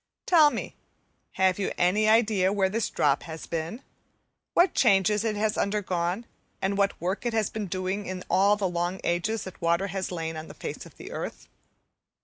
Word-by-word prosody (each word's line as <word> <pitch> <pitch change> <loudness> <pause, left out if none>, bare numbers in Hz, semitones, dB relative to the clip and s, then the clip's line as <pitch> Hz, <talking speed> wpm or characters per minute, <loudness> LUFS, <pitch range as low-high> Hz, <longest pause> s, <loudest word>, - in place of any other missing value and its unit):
Tell 315 -4 +6
me, - - -5 0.6
have 190 0 +2
you 195 - -1
any 205 +5 +3
idea 215 -4 +4
where 195 -2 +2
this 220 +3 -1
drop 145 -2 +2
has 160 0 -7
been? 165 +10 -4 0.7
what 350 +1 +5
changes 210 -2 +3
it 220 -2 0
has 215 +1 0
undergone, 190 0 -1 0.3
and 195 +1 0
what 200 0 +1
work 185 +4 -2
it 240 -1 -1
has 220 -2 0
been 215 -2 -4
doing 185 +3 -2
during 185 -1 -5
all 200 +2 +4
the 205 -2 -1
long 175 +1 -2
ages 195 +6 0
that 190 - -10
water 170 +3 +2
has 190 0 -3
lain 165 -2 -4
on 155 +1 -7
the - - -11
face - - -6
of - - -19
the - - -9
earth? - - -6
195 Hz, 185 wpm, -27 LUFS, 180-215 Hz, 0.7 s, Tell